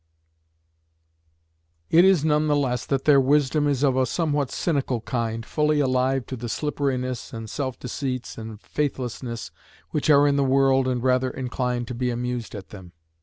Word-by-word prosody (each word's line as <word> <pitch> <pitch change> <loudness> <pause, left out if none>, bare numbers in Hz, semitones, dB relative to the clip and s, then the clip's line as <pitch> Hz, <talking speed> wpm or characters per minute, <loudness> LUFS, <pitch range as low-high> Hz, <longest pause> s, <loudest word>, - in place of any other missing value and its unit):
It 170 +2 +7
is 185 -5 +4
none 150 0 +2
the 150 - +3
less 125 -4 -1
that 135 -1 -1
their 140 -2 +6
wisdom 145 +2 +2
is 140 -1 0
of 135 -3 +3
a 130 -1 +2
somewhat 145 -2 0
cynical 135 -8 -1
kind, 115 -1 -3
fully 150 +1 +1
alive 130 -1 +1
to 130 - -6
the 120 -1 -6
slipperiness 130 -3 -2
and 115 -1 -6
self 130 +2 -4
deceits 125 0 -4
and 110 -2 -8
faithlessness 125 -4 -4 0.4
which 150 0 -1
are 145 -1 +6
in 140 -1 +2
the 140 - +3
world 135 0 +3
and 125 -2 -1
rather 130 0 +2
inclined 125 -2 -3
to - - -3
be 125 +1 -1
amused 120 -1 -3
at 100 -2 -9
them. 95 -4 -12
130 Hz, 170 wpm, -24 LUFS, 125-145 Hz, 0.4 s, It